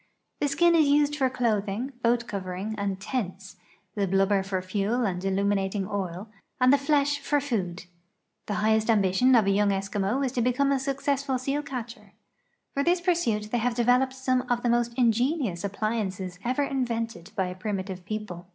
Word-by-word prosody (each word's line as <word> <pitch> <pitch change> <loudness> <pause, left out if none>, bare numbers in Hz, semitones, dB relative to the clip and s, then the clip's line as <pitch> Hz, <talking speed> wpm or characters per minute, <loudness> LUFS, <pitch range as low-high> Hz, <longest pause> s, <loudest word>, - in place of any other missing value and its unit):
The 290 - +1
skin 340 +5 +3
is 315 -3 +5
used 290 +1 +3
for 265 -3 +2
clothing, 230 0 -1
lioat 235 0 +2
covering, 195 +1 -4
and 200 -2 -2
tents, 200 -3 -4 0.4
the 200 -2 0
liluhhcr 195 +1 +2
for 190 -1 -2
fuel 205 +6 0
and 180 -2 -2
illuminating 195 0 0
oil, 195 -1 -4 0.3
and 255 +1 +5
the 285 - +4
flesh 285 0 +2
for 290 +1 +1
food. 200 -11 -3 0.6
The 205 - -2
highest 220 +1 +2
ambition 215 +4 +4
of 225 -4 +5
a 195 - +3
young 205 +1 +3
Eskimo 200 +6 -1
is 255 - -1
to 245 - -1
become 255 +4 +2
a 275 - +2
successful 275 0 -1
seal 275 +3 -1
catcher'. 250 -4 -7 0.6
For 280 - 0
this 350 +3 +3
pursuit 290 - 0
they 240 - +1
have 240 +1 0
developed 250 +2 +3
some 260 -1 0
of 240 0 0
the 240 - +2
most 240 0 +2
ingenious 240 - +1
ap])liances 200 -3 -3
ever 255 +4 0
invented 230 -8 -3
by 190 - +1
a 180 - -6
primitive 190 -1 -4
people. 195 -4 -6
225 Hz, 175 wpm, -27 LUFS, 195-265 Hz, 0.6 s, is